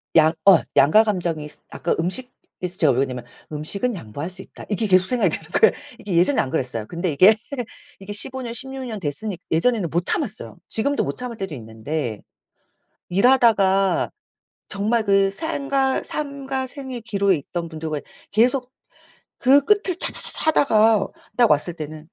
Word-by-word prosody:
양 160 0 +6
어 195 -4 +8 0.2
양가감정이 170 -1 +3
스 - - -14
아까 170 - -2
음식에서 185 -2 -4
제가 155 -4 +4
왜 - - -2
그러냐면 130 -3 -2 0.3
'음식은 195 +11 -2
양보할 145 - -6
수 185 +1 -9
있다.' - - -13
이게 215 +1 0
계속 185 -1 +4
생각이 250 -2 +2
드는 - - -16
거예요. 450 - +6 0.3
이게 200 -3 -4
예전에는 180 +11 +3
안 135 - -6
그랬어요. 125 -5 -3
근데 175 0 -2
이게, 185 +9 +6 0.6
이게 195 +1 -7
15 260 +5 -1
년, 235 -2 -5
16 265 +2 -4
년 220 -3 -5
됐으니 180 +5 -4
예전에는 190 +2 +1
못 175 +1 0
참았어요. 210 - -3
지금도 280 +6 +1
못 - - -3
참을 245 -2 -6
때도 195 -6 -5
있는데, 115 +1 -5 0.9
일하다가 195 -4 +3 0.6
정말 215 +3 0
그 195 -1 +3
생과 275 0 -1
삶과 275 -3 -4
생의 260 -2 -7
기로에 200 -4 +1
있던 170 +3 -5
분들과 155 -2 -4 0.3
계속 250 +3 +2 0.7
그 275 +2 +4
끝을 395 -4 +2
차차차차 - - +1
하다가 225 -8 +4 0.3
딱 240 -3 +5
왔을 150 +4 +1
때는 155 -1 -8
200 Hz, 330 characters per minute, -22 LUFS, 160-250 Hz, 0.9 s, 어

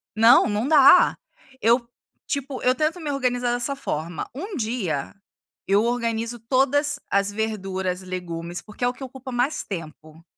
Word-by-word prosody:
Não, 225 +3 +6
não 210 +5 -1
dá. 305 +3 +6 0.4
Eu, 235 +1 +3 0.4
tipo, 280 -2 -4
eu 255 - +4
tento 310 +5 0
me 300 -3 -3
organizar 245 -3 0
dessa 245 +3 0
forma: 170 - -4
1 370 - -6
dia 215 - -2 0.5
eu 200 +2 +3
organizo 235 0 -1
todas 270 +5 +1
as 200 0 +2
verduras, 195 -4 -3
legumes, 175 -2 -5
porque 210 +3 -9
é - - +4
o 245 - -1
que 265 - -10
ocupa 260 0 -8
mais 245 +5 0
tempo. 160 -3 -9
235 Hz, 150 wpm, -23 LUFS, 190-265 Hz, 0.5 s, Não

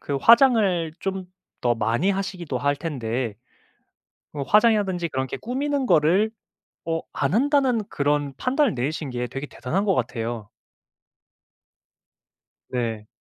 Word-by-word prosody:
그 140 - -3
화장을 210 - +5
좀 190 -1 -3 0.4
더 120 -1 +3
많이 115 - 0
하시기도 185 -7 -3
할 145 +3 +1
텐데 125 -7 -3 1.0
어 150 - -5
화장이라든지 205 - +3
그렇게 130 -3 -3
꾸미는 275 +3 -2
거를 185 +8 +3 0.6
어 165 0 -1
안 140 +2 -1
한다는 265 -1 +3
그런 145 -1 0
판단을 265 - +1
내리신 145 +4 -2
게 125 0 -3
되게 135 +3 -5
대단한 185 +12 -2
것 195 - +2
같아요. 115 -3 -3 2.2
네. 115 -4 -3
160 Hz, 245 characters per minute, -24 LUFS, 130-210 Hz, 2.2 s, 화장을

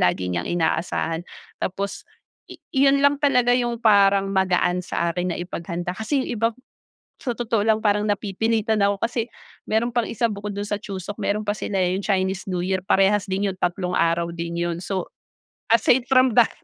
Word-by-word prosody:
lagi 90 +1 +1
niyang 85 -1 -2
inaasahan. 165 0 -1 0.4
Tapos 195 +2 -3 0.5
i - - -10 0.2
iyon 275 +1 +4
lang 285 0 +4
talaga 250 -4 +4
yung 240 -2 -1
parang 200 -2 +5
magaan 180 -2 +1
sa 170 - -1
akin 180 -1 -1
na - - -6
ipaghanda 175 0 -4
kasi 260 +5 0
yung - - -6
iba 230 0 +1 0.7
sa 245 - -2
totoo 230 -3 0
lang 220 -1 +3
parang 210 0 +2
napipilitan 215 +2 0
ako 200 0 +1
kasi 235 0 -1 0.4
meron 225 +2 +1
pang 240 -2 +1
isa 235 - 0
bukod 205 -1 -5
dun 205 0 -3
sa 205 - -1
Chuseok 195 0 -6
meron 210 +1 0
pa 205 - +2
sila, 195 - -3
eh, 180 0 +1
yung 195 - -2
Chinese 190 -1 0
New 180 -1 -1
Year 190 0 0
parehas 195 +1 +3
din 195 +1 0
yun 185 - -11
tatlong 180 0 -1
araw 170 0 +1
din 170 0 -4
yun. 170 0 -2
So 185 -2 -3 0.7
aside 240 +2 +4
from 255 -3 +4
that 240 - +6
200 Hz, 185 wpm, -23 LUFS, 180-225 Hz, 0.7 s, that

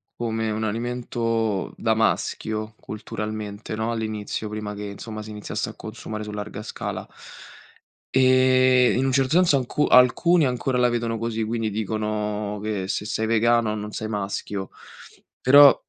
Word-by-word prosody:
come 110 -1 -2
un 110 +1 -2
alimento 115 -2 -1
da 110 - +1
maschio 110 0 -1
culturalmente, 105 0 -5
no, 110 +2 -1
all'inizio 110 -1 -3
prima 105 0 -5
che 105 0 -7
insomma 110 +2 -7
si 110 - -9
iniziasse 105 -1 -4
a - - -8
consumare 110 -1 -7
su 105 - -6
larga 105 0 -6
scala. - - -5 1.1
E 130 -1 +5
in 130 +2 +1
un 135 - +2
certo 130 0 +2
senso 175 -6 +5
alcu 135 +3 0
alcuni 150 +7 +5
ancora 125 0 0
la 125 - +4
vedono 115 -1 -1
così, 115 0 -2
quindi 110 0 -1
dicono 105 -1 -2
che 105 -3 -2
se 105 +1 -2
sei 110 +1 -1
vegano 115 0 +3
non 105 0 -5
sei 110 - -4
maschio; 100 -2 -3 0.7
però 140 +2 +8
110 Hz, 145 wpm, -24 LUFS, 105-120 Hz, 1.1 s, però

